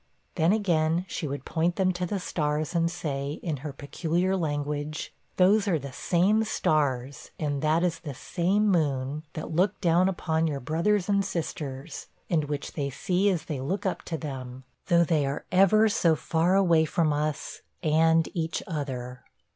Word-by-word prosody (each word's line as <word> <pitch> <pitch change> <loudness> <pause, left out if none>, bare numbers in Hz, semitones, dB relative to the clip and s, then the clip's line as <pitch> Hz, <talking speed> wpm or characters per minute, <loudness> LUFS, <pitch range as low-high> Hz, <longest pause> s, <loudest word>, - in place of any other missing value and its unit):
Then 165 +3 +3
again, 175 -5 +1
she 160 - -4
would 140 -1 -5
point 170 +2 0
them 185 -1 +2
to 180 0 -2
the 200 +2 -2
stars, 155 -2 -2
and 170 -1 +2
say, 140 -4 -3
in 160 -4 -2
her 145 +3 -6
peculiar 170 +7 -1
language, 150 -2 -3 0.2
'Those 200 +3 +4
are 175 -5 +2
the 140 -2 -7
same 195 - +2
stars, 140 - -1
and 145 -3 -1
that 155 +2 +2
is 170 -2 0
the 150 -5 -7
same 190 - 0
moon, 145 -5 0
that 155 - -6
look 185 +5 +1
down 175 +1 +3
upon 160 -3 0
your 145 -3 -2
brothers 170 +8 0
and 200 -1 +2
sisters, 155 -5 -5 0.2
and 155 -3 +2
which 145 -1 -4
they 140 -3 -2
see 185 +8 +1
as 180 -5 -1
they 145 -4 -4
look 185 +10 -2
up 190 - -1
to 165 - -3
them, 130 -4 -7 0.2
though 170 0 +5
they 160 -3 +1
are 140 +2 -4
ever 195 +4 +5
so 175 -7 +3
far 165 +4 +1
away 170 -5 +4
from 155 -1 +1
us, 150 0 -3 0.2
and 160 +1 +4
each 165 -1 -2
other.' 130 -6 -5
160 Hz, 170 wpm, -27 LUFS, 145-180 Hz, 0.2 s, though